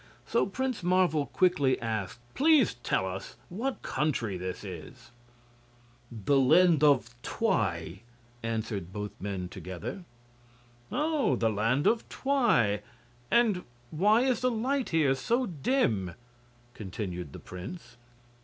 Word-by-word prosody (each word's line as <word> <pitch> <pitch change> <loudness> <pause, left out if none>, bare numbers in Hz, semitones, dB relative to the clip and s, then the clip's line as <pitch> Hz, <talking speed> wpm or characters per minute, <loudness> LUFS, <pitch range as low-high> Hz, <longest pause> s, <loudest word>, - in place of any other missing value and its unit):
So 235 - +1
Prince 255 +4 -2
Marvel 175 -4 +2
quickly 145 -8 +2
asked: 110 -1 -3
"Please 295 - +4
tell 120 -5 -1
us 95 +1 -6
what 240 +9 -3
country 120 -10 -1
this 90 +1 -5
is?" 90 -2 -9 1.0
"The 120 +5 +1
Land 160 +3 +5
of 130 -5 +4
Twi," 95 - -1 0.4
answered 110 -5 -3
both 105 +1 -5
men, 95 -2 -3
together. 95 - -7 0.9
"Oh! 300 - +1
the 115 -2 +1
Land 115 +7 +1
of 230 0 +2
Twi. 215 - +2 0.5
And 220 -6 +3 0.3
why 210 +8 +4
is 255 -3 +2
the 255 - +3
light 255 +3 -1
here 155 -5 +3
so 235 - 0
dim?" 135 - 0 0.6
continued 90 -6 -5
the - - -9
prince. 110 - -9
135 Hz, 115 wpm, -29 LUFS, -, 1.0 s, Land